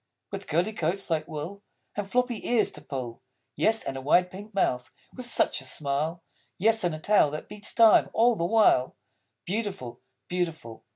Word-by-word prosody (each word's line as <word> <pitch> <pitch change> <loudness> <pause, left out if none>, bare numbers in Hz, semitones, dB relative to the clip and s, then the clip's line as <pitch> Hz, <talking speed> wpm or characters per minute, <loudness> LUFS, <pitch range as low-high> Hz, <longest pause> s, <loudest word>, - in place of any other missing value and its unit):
With - - -6
curly 175 +8 0
coats, 185 0 -1
like 155 0 0
wool; 165 +6 -6 0.3
And 200 -1 -4
floppy 245 -1 0
ears 235 -3 +3
to - - -11
pull; 125 -3 -6 0.3
Yes, 225 0 +2
and 135 - -4
a 135 - -5
wide 180 +6 +3
pink 205 +3 -10
mouth, 125 -11 0 0.2
with 250 -1 -5
such 240 - +1
a - - -7
Smile! 150 +5 -2 0.3
Yes, 220 +3 +3
and 175 -3 0
a - - -8
Tail 200 -3 +4
that 150 +1 -6
beats 210 0 -3
time 225 -2 +6
all 235 +1 +3
the 170 - -2
while; 175 - +3 0.5
Beautiful, 190 - -4 0.3
Beautiful! 165 -10 -4
180 Hz, 175 wpm, -27 LUFS, 150-215 Hz, 0.5 s, time